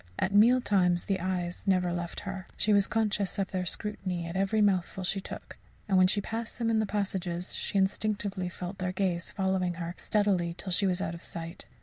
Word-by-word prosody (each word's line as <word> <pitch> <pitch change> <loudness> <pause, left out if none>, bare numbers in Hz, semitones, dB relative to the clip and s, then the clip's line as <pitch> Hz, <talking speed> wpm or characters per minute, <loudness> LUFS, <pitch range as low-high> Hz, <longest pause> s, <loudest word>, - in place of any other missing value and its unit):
At 190 +1 0
meal 235 +5 +6
times 180 -6 +2
the 195 -2 0
eyes 180 0 -3
never 180 -2 +3
left 170 -1 -4
her; 190 -1 -6
she 210 - +3
was 200 -1 +4
conscious 210 -3 0
of 195 -1 -1
their 185 -2 -1
scrutiny 185 -3 -3
at 170 +1 -6
every 195 +3 +2
mouthful 190 -2 +2
she 195 +2 0
took; - - -9 0.3
and 195 - +2
when 185 0 +7
she 205 - +1
passed 225 +2 -4
them 230 -1 +1
in 220 - +3
the 215 - +1
passages, 190 -3 -2
she - - -2
instinctively 195 -1 0
felt 180 +2 -6
their 185 0 -1
gaze 185 -3 0
following 190 -2 0
her 170 0 -4
steadily 190 -5 +1
till 190 - -5
she 195 +2 +3
was 185 +1 0
out 165 - -2
of 170 - -9
sight. 170 +1 -7
190 Hz, 210 wpm, -29 LUFS, 180-205 Hz, 0.3 s, when